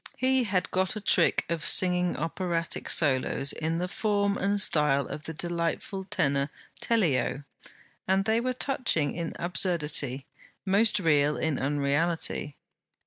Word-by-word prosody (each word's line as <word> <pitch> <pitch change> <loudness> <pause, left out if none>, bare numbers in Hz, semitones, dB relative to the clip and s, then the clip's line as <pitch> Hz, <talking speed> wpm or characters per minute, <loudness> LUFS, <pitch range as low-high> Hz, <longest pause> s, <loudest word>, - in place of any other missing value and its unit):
He 260 -1 +2
had 185 -3 -1
got 185 +2 0
a - - -4
trick 205 - +2
of 170 -2 -3
singing 180 -1 +3
operatic 170 +1 -3
solos 140 -1 +2
in 160 +1 -2
the 180 +1 -2
form 200 0 0
and 200 +1 0
style 150 -6 +3
of 150 - -8
the 160 - -5
delightful 175 +4 -3
tenor 140 -5 0 0.3
Tellio, 165 - 0 0.6
and 190 +1 +2
they 225 +1 +1
were 255 +1 -1
touching 240 - 0
in 165 -1 -4
absurdity, 150 -7 -2 0.4
most 205 +3 +3
real 150 -4 +2
in 160 -4 -1
unreality. 145 +2 -1
170 Hz, 135 wpm, -27 LUFS, 150-195 Hz, 0.6 s, singing